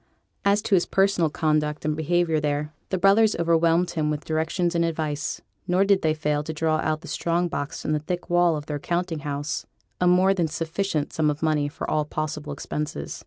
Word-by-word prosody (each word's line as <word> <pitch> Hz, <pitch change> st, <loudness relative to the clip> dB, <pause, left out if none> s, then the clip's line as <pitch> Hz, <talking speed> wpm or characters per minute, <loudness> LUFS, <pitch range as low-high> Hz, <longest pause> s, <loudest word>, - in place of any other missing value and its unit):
As 200 Hz, +1 st, +3 dB
to -, -, -1 dB
his 180 Hz, -2 st, +4 dB
personal 195 Hz, -4 st, +2 dB
conduct 150 Hz, -1 st, 0 dB
and 155 Hz, 0 st, +1 dB
behaviour 160 Hz, +1 st, +1 dB
there, 150 Hz, 0 st, -2 dB, 0.2 s
the 190 Hz, -, 0 dB
brothers 205 Hz, +3 st, +4 dB
overwhelmed 170 Hz, +1 st, +2 dB
him 155 Hz, -3 st, -1 dB
with 150 Hz, 0 st, -3 dB
directions 165 Hz, +2 st, 0 dB
and 170 Hz, -1 st, +2 dB
advice; 155 Hz, -3 st, -2 dB, 0.3 s
nor 185 Hz, +2 st, +3 dB
did 195 Hz, -1 st, +3 dB
they 155 Hz, -1 st, +1 dB
fail 150 Hz, -1 st, 0 dB
to 150 Hz, -, -5 dB
draw 155 Hz, 0 st, +1 dB
out 155 Hz, 0 st, 0 dB
of 155 Hz, -, -6 dB
the -, -, -11 dB
strong 170 Hz, +1 st, 0 dB
box 145 Hz, -4 st, -4 dB
in -, -, 0 dB
the 150 Hz, -, +1 dB
thick 175 Hz, +4 st, -4 dB
wall 175 Hz, -1 st, +3 dB
of 145 Hz, -, -7 dB
their 150 Hz, -1 st, -4 dB
counting 170 Hz, +1 st, -2 dB
house 145 Hz, 0 st, -4 dB, 0.3 s
a 180 Hz, -, +3 dB
more 185 Hz, +2 st, +5 dB
than 175 Hz, -4 st, 0 dB
sufficient 165 Hz, 0 st, -2 dB
sum 155 Hz, -1 st, +2 dB
of 150 Hz, +2 st, -3 dB
money 155 Hz, -2 st, +2 dB
for 150 Hz, -, -6 dB
all 155 Hz, -, +1 dB
possible 150 Hz, 0 st, -4 dB
expenses. 145 Hz, -, -4 dB
160 Hz, 210 wpm, -25 LUFS, 150-175 Hz, 0.3 s, more